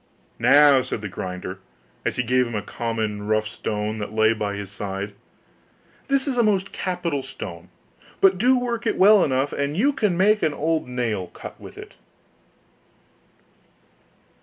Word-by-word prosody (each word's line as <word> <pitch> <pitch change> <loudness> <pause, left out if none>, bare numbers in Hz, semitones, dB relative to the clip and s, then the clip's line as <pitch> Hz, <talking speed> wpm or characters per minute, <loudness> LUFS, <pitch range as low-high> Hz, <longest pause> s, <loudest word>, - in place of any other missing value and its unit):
'Now,' 145 -2 +6
said 110 -3 -5
the - - -2
grinder, 90 0 -6 0.5
as - - 0
he 125 - 0
gave 125 +1 +2
him 120 - -6
a 105 - -2
common 110 -2 -3
rough 110 0 +1
stone 105 0 -3
that 105 - -5
lay 110 0 +3
by 105 -2 -3
his 100 -1 -6
side, 100 0 -5 0.9
'this 275 0 +1
is 260 -3 -1
a - - +5
most 195 -3 +1
capital 175 -6 -2
stone; 90 -9 -8 0.5
do 195 +7 +4
but 245 - -3
work 235 -1 -2
it - - 0
well 205 0 +7
enough, 135 +1 0
and 140 +2 -2
you 280 +8 +3
can 210 -9 0
make 210 +3 +4
an 155 -2 0
old 160 -1 -1
nail 115 -7 -2
cut - - -11
with - - -11
it. - - -11
125 Hz, 160 wpm, -23 LUFS, -, 0.9 s, well